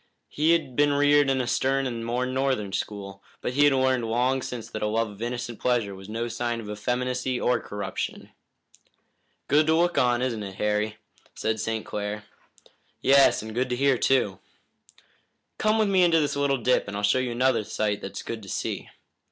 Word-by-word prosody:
He 155 Hz, +3 st, +2 dB
had 145 Hz, -7 st, -1 dB
been 145 Hz, +1 st, +3 dB
reared 145 Hz, 0 st, +4 dB
in 135 Hz, -1 st, +1 dB
a -, -, -2 dB
stern 135 Hz, +3 st, +1 dB
and 120 Hz, -3 st, -3 dB
more 120 Hz, +2 st, -1 dB
northern 130 Hz, -6 st, -1 dB
school, 100 Hz, -2 st, -5 dB, 0.2 s
but 125 Hz, -, -3 dB
he 145 Hz, +2 st, +4 dB
had 145 Hz, -, +5 dB
learned 130 Hz, -2 st, +2 dB
long 125 Hz, +3 st, +1 dB
since 120 Hz, -3 st, -6 dB
that 110 Hz, -, -6 dB
a 105 Hz, -, +1 dB
love 110 Hz, 0 st, 0 dB
of 100 Hz, +1 st, -13 dB
innocent 120 Hz, -1 st, -4 dB
pleasure 120 Hz, -5 st, 0 dB
was 95 Hz, +1 st, -11 dB
no 115 Hz, +2 st, -2 dB
sign 120 Hz, 0 st, -2 dB
of 105 Hz, -2 st, -7 dB
effeminacy 125 Hz, +4 st, -2 dB
or 125 Hz, -, +2 dB
corruption. 105 Hz, 0 st, -5 dB, 1.2 s
"Good 150 Hz, +2 st, +3 dB
to 160 Hz, -, +4 dB
look 175 Hz, +1 st, +2 dB
on, 125 Hz, 0 st, +2 dB
isn't 120 Hz, -4 st, -2 dB
it, 100 Hz, -2 st, -7 dB
Harry?" 105 Hz, +1 st, -1 dB, 0.4 s
said 110 Hz, 0 st, -1 dB
St. 110 Hz, 0 st, -2 dB
Clair. 105 Hz, 0 st, -4 dB, 0.8 s
"Yes, 135 Hz, -4 st, +5 dB
and 110 Hz, 0 st, -7 dB
good 125 Hz, +3 st, -1 dB
to 125 Hz, -, 0 dB
hear, 135 Hz, -1 st, +2 dB
too." 105 Hz, -8 st, +2 dB, 1.2 s
"Come 215 Hz, +1 st, +2 dB
with 215 Hz, -1 st, +3 dB
me 190 Hz, -2 st, +3 dB
into 170 Hz, -2 st, +5 dB
this 145 Hz, -2 st, 0 dB
little 140 Hz, -1 st, +1 dB
dip, 125 Hz, -1 st, +1 dB
and 100 Hz, 0 st, -4 dB
I'll 105 Hz, -, -4 dB
show 105 Hz, +5 st, +3 dB
you 130 Hz, -1 st, -1 dB
another 125 Hz, -2 st, +2 dB
sight 105 Hz, 0 st, -2 dB
that's 95 Hz, -, -6 dB
good 115 Hz, -1 st, -5 dB
to 100 Hz, -, -11 dB
see." -, -, -3 dB
125 Hz, 195 wpm, -26 LUFS, 110-135 Hz, 1.2 s, had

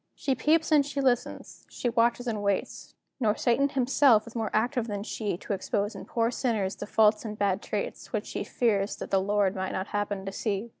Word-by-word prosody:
She 270 Hz, -, 0 dB
peeps 315 Hz, +5 st, +2 dB
and 295 Hz, -2 st, +6 dB
she 285 Hz, 0 st, -4 dB
listens, 255 Hz, -3 st, -1 dB
she -, -, -3 dB
watches 235 Hz, +1 st, +2 dB
and 220 Hz, -4 st, -2 dB
waits, 200 Hz, -1 st, -2 dB, 0.2 s
Nor 220 Hz, -4 st, +2 dB
Satan 255 Hz, +4 st, +2 dB
himself 260 Hz, -4 st, +4 dB
is 230 Hz, -, -11 dB
more 225 Hz, -2 st, -1 dB
active 240 Hz, +2 st, 0 dB
than 205 Hz, -2 st, -3 dB
she 210 Hz, -4 st, -3 dB
To 200 Hz, -, -4 dB
expose 200 Hz, +2 st, -1 dB
in -, -, -8 dB
poor 230 Hz, 0 st, 0 dB
sinners 220 Hz, -7 st, -1 dB
the 205 Hz, -, -7 dB
faults 215 Hz, 0 st, +3 dB
and 215 Hz, -2 st, -6 dB
bad 200 Hz, -1 st, +1 dB
traits, -, -, -4 dB
Which -, -, -2 dB
she -, -, -4 dB
fears 210 Hz, -5 st, 0 dB
that -, -, -8 dB
the 195 Hz, -, +3 dB
Lord 200 Hz, 0 st, +1 dB
might 190 Hz, 0 st, -3 dB
not 190 Hz, +2 st, -3 dB
happen 205 Hz, -1 st, -2 dB
to 195 Hz, -, -4 dB
see. 205 Hz, +2 st, -2 dB
220 Hz, 210 wpm, -28 LUFS, 200-245 Hz, 0.2 s, and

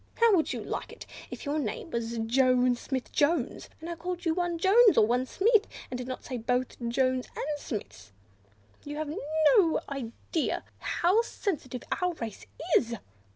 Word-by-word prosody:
"How 465 Hz, -3 st, +5 dB
would 320 Hz, -, +1 dB
you -, -, -4 dB
like -, -, -4 dB
it -, -, -10 dB, 0.2 s
if -, -, -8 dB
your 290 Hz, +2 st, 0 dB
name 270 Hz, +5 st, -4 dB
was 235 Hz, -1 st, -2 dB
Jones 250 Hz, +1 st, +3 dB
Smith 260 Hz, -3 st, -4 dB
Jones, 290 Hz, -3 st, +1 dB
and 320 Hz, -, -8 dB
I 340 Hz, -, -3 dB
called 355 Hz, +1 st, -5 dB
you 325 Hz, -, +3 dB
one 350 Hz, -1 st, -1 dB
Jones, 405 Hz, +6 st, +6 dB
or -, -, +7 dB
one 250 Hz, +3 st, +1 dB
Smith, 435 Hz, -, +3 dB, 0.2 s
and 250 Hz, -, -2 dB
did 250 Hz, -, -5 dB
not 255 Hz, -, -5 dB
say 255 Hz, -, -4 dB
both 250 Hz, +2 st, 0 dB
the 235 Hz, -1 st, -5 dB
Joneses 255 Hz, +1 st, +1 dB
and -, -, -3 dB
the 290 Hz, -, -10 dB
Smiths? 105 Hz, -, -6 dB, 0.7 s
You 295 Hz, 0 st, -6 dB
have 305 Hz, 0 st, -3 dB, 0.4 s
no 330 Hz, -5 st, +3 dB
idea 275 Hz, +4 st, -3 dB, 0.2 s
how 370 Hz, +6 st, +2 dB
sensitive 305 Hz, -, -4 dB, 0.2 s
our 360 Hz, -1 st, +1 dB
race 230 Hz, -9 st, -7 dB, 0.3 s
is. 235 Hz, -2 st, +2 dB
275 Hz, 180 wpm, -29 LUFS, 245-345 Hz, 0.7 s, or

